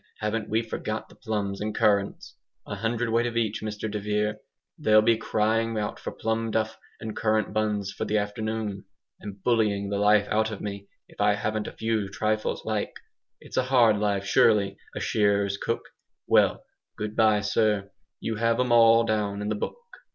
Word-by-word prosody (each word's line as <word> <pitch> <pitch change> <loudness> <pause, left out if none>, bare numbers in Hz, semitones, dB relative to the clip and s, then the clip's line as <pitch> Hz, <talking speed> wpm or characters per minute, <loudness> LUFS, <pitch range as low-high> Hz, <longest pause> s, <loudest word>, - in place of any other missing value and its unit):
haven't 110 +1 -2
we 110 +2 +1
forgot 110 -1 -4
the - - -17
plums 105 -4 -3
and 105 0 -3
currants? 100 -2 +1 0.3
A 105 - -5
hundredweight 115 +2 0
of 115 -1 -3
each, 110 -2 0
Mr 105 0 -4
de 105 - -2
Vere! 105 +1 -1 0.4
They'll 110 0 +5
be 115 +1 +4
crying 115 +1 0
out 105 -1 -3
for - - -5
plum 115 0 -2
duff 110 0 -1 0.2
and 110 -1 -6
currant 110 0 0
buns 105 -2 0
for - - -4
the 105 - +1
afternoon; 105 -1 -3 0.3
and 100 -2 -9
bullying 105 -4 +1
the 100 - 0
life 105 0 +4
out 110 +1 +2
of 105 -3 -6
me, 100 -1 -6 0.2
if - - -8
I 105 0 +4
haven't 110 +1 -2
a - - -5
few 110 -3 -1
trifles 110 +2 -1
like. 110 -2 -2 0.5
It's - - -9
a 130 - +4
hard 120 -5 +4
life, 100 -2 0
surely, 100 0 +3 0.2
a - - -3
shearers' 100 -2 +1
cook. 115 - -2 0.4
Well, - - +3 0.3
good 105 0 -4
bye, 110 -2 +4
sir, 105 -1 +1 0.3
you 110 -1 -3
have 115 +1 +1
'em 125 -1 +1
all 115 0 +6
down 105 -2 -1
in 105 0 -3
the 105 - 0
book." 105 - -4
110 Hz, 180 wpm, -26 LUFS, 105-110 Hz, 0.5 s, all